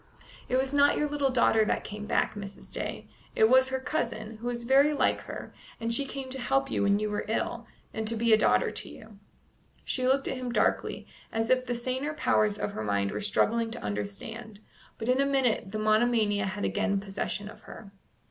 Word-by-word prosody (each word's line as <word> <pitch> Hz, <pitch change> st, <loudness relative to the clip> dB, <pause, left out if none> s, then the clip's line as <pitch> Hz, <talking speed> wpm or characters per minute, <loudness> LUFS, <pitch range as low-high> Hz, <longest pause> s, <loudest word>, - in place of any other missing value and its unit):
"It 255 Hz, -, +2 dB
was 265 Hz, +1 st, 0 dB
not 285 Hz, 0 st, +4 dB
your 300 Hz, -, +1 dB
little 290 Hz, -2 st, 0 dB
daughter 235 Hz, -3 st, +4 dB
that 215 Hz, -, 0 dB
came 210 Hz, 0 st, -7 dB
back, -, -, +1 dB
Mrs. 200 Hz, -1 st, -9 dB
Day. -, -, -4 dB, 0.3 s
It 220 Hz, -, +5 dB
was 260 Hz, +2 st, +5 dB
her 265 Hz, 0 st, -1 dB
cousin, 220 Hz, -6 st, -3 dB
who 240 Hz, +2 st, -4 dB
is 240 Hz, -1 st, -3 dB
very 275 Hz, +4 st, +4 dB
like 290 Hz, -, +1 dB
her, -, -, -8 dB, 0.3 s
and 230 Hz, 0 st, 0 dB
she 280 Hz, +3 st, +3 dB
came 265 Hz, -1 st, -6 dB
to 265 Hz, -, -4 dB
help 270 Hz, +2 st, +1 dB
you -, -, 0 dB
when 200 Hz, 0 st, +3 dB
you 215 Hz, +1 st, -1 dB
were 210 Hz, -, -1 dB
ill, 235 Hz, +1 st, -2 dB, 0.3 s
and 220 Hz, 0 st, -3 dB
to 230 Hz, -, 0 dB
be 230 Hz, 0 st, +3 dB
a -, -, +8 dB
daughter 105 Hz, -, +3 dB
to -, -, -6 dB
you." 215 Hz, -2 st, -13 dB, 0.7 s
She 255 Hz, -1 st, 0 dB
looked 270 Hz, +1 st, +2 dB
at -, -, -2 dB
him 250 Hz, -1 st, -4 dB
darkly, -, -, 0 dB, 0.3 s
as 225 Hz, +1 st, -1 dB
if 255 Hz, 0 st, +2 dB
the 245 Hz, -, -1 dB
saner 260 Hz, +5 st, -3 dB
powers 210 Hz, -6 st, +2 dB
of -, -, -2 dB
her 110 Hz, -, -5 dB
mind 100 Hz, -1 st, 0 dB
were -, -, -4 dB
struggling 225 Hz, +2 st, +1 dB
to -, -, -7 dB
understand; 105 Hz, -, -5 dB, 0.4 s
but 225 Hz, -, -5 dB
in 255 Hz, +2 st, +3 dB
a -, -, +4 dB
minute 250 Hz, -7 st, +1 dB
the 215 Hz, -, -3 dB
monomania 215 Hz, -1 st, +2 dB
had 205 Hz, +2 st, -3 dB
again 205 Hz, -1 st, 0 dB
possession 200 Hz, +1 st, -4 dB
of 210 Hz, -, -12 dB
her. 200 Hz, -3 st, -11 dB
225 Hz, 215 wpm, -28 LUFS, 210-260 Hz, 0.7 s, a